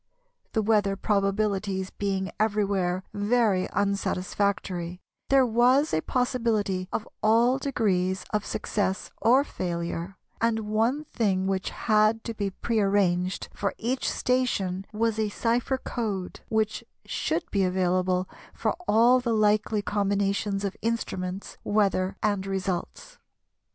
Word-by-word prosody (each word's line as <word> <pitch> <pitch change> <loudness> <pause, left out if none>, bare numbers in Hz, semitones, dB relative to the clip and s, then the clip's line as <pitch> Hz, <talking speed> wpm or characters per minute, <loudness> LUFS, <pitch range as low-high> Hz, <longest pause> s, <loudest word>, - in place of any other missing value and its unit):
The 220 - +1
weather 205 -2 +2
probabilities 195 -1 0
being 195 -2 -2
everywhere 200 -4 +1
very 205 -2 +2
unsatisfactory, 190 -2 -1 0.3
there 270 -1 +5
was 250 +5 +3
a 160 - +2
possibility 220 -7 0
of 220 - -3
all 235 +4 +4
degrees 190 -9 0
of 210 -1 +1
success 200 -2 -2
or 250 +6 +5
failure, 170 - -4 0.2
and 225 -1 +2
one 225 +7 0
thing 195 -8 0
which 190 -1 -1
had 215 0 +2
to 230 - -4
be 205 -2 -2
prearranged 195 -3 0
for 200 - -2
each 250 +3 -1
station 195 -7 0
was 220 0 0
a 215 -1 +1
cypher 235 +5 0
code 210 -8 -4
which 220 -1 0 0.2
should 320 +1 -1
be 200 -2 +2
available 185 0 +1 0.3
for - - 0
all 235 +4 +5
the 235 -2 0
likely 215 0 +2
combinations 200 0 0
of 195 - -3
instruments, 195 -5 -3
weather 195 -3 +1
and 205 -2 0
results. 195 - -4
205 Hz, 120 wpm, -27 LUFS, 190-225 Hz, 0.3 s, there